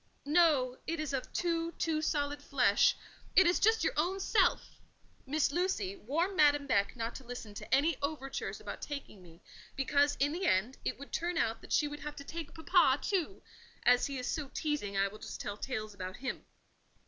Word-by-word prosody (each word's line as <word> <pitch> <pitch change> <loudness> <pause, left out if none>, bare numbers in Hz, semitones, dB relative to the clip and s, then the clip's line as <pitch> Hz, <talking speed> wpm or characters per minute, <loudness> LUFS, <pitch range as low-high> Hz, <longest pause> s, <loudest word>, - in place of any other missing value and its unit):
"No! 290 -5 +3
it 330 0 -2
is 305 -2 -3
of 265 - -3
too—too 335 -2 -1
solid 290 -2 -1
flesh: 250 -8 +3 0.4
it 380 - +8
is 350 +1 +3
just 445 +1 +4
your - - +1
own 360 +5 0
self. 385 - +1 0.5
Miss 295 +1 +1
Lucy, 290 - -1
warn 330 - -1
Madame 290 -3 +4
Beck 200 -6 +1
not 230 -1 -3
to - - -9
listen 240 -4 -8
to - - -9
any 305 +5 +4
overtures 280 -2 -3
about - - -7
taking 280 -9 -7
me, 170 +1 -17 0.3
because, 285 +1 +2
in 285 +1 +2
the 360 +3 -1
end, 205 +8 +1
it - - -2
would 280 - -11
turn 340 +1 -1
out 230 -6 0
that - - -13
she 295 - +3
would 295 0 -7
have 300 0 -6
to 280 - -8
take 320 +1 -7
papa 320 -5 +4
too: 385 -1 -2 0.4
as 245 0 +5
he 280 -1 -4
is 250 - -4
so 290 +1 -2
teasing, 290 -11 -2
I 195 0 +3
will 210 +2 -10
just - - -7
tell 205 - -4
tales 215 -2 -4
about 185 -1 -6
him. 265 - -5
285 Hz, 195 wpm, -32 LUFS, 245-325 Hz, 0.5 s, it